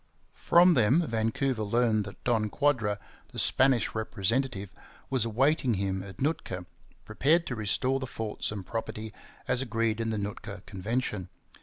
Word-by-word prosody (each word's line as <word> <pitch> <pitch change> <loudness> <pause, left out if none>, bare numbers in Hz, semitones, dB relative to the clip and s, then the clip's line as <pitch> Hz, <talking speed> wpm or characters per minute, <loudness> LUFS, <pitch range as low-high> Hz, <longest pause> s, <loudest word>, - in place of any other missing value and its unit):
From 175 +1 +5
them 135 +6 +4
Vancouver 115 +1 0
learned 110 0 +2
that 100 - -11
Don 110 -3 +1
Quadra, 115 -7 +1 0.3
the - - -12
Spanish 130 -3 +3
representative, 110 -1 -1 0.4
was 130 -4 +2
awaiting 130 +2 +2
him 95 0 -1
at 95 0 -10
Nootka, 135 - -2 0.4
prepared 165 +4 +2
to 125 - -3
restore 125 +5 0
the 130 - -4
forts 110 -3 -3
and 100 -3 -5
property 110 -1 -5 0.3
as 125 - +2
agreed 115 -2 0
in 115 - -1
the 110 - -1
Nootka 100 -1 -5
Convention. 105 -1 -3
115 Hz, 145 wpm, -29 LUFS, 105-130 Hz, 0.4 s, From